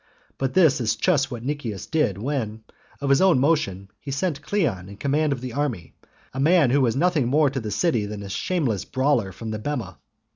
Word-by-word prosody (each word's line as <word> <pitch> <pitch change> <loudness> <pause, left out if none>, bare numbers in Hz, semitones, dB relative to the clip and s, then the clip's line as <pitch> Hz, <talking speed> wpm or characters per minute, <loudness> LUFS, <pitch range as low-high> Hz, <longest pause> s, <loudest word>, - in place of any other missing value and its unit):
But 135 +2 -2
this 160 -8 +4
is 110 - +1
just 145 -7 +2
what 120 -4 -6
Nicias 130 -9 -4
did 150 - 0
when, 110 -3 -3 0.4
of 140 -1 0
his 140 - +4
own 190 -6 +5
motion, 105 - 0
he 145 - -9
set 145 +2 -2
Cleon 130 - -1
in 100 - -11
command 145 +5 +1
of 130 -3 -2
the 125 -2 -6
army, 125 - -3 0.4
a 135 - -5
man 155 -2 +4
who 140 +2 +3
was 120 -3 +2
nothing 155 -3 +2
more 145 +1 +3
to 135 - -2
the 110 -3 -5
city 110 - 0
than 105 -1 -6
a 100 - -8
shameless 125 - -1
brawler 130 -7 0
from 110 +4 -7
the 110 - -4
bema. 105 - -4
135 Hz, 210 wpm, -24 LUFS, 110-150 Hz, 0.4 s, own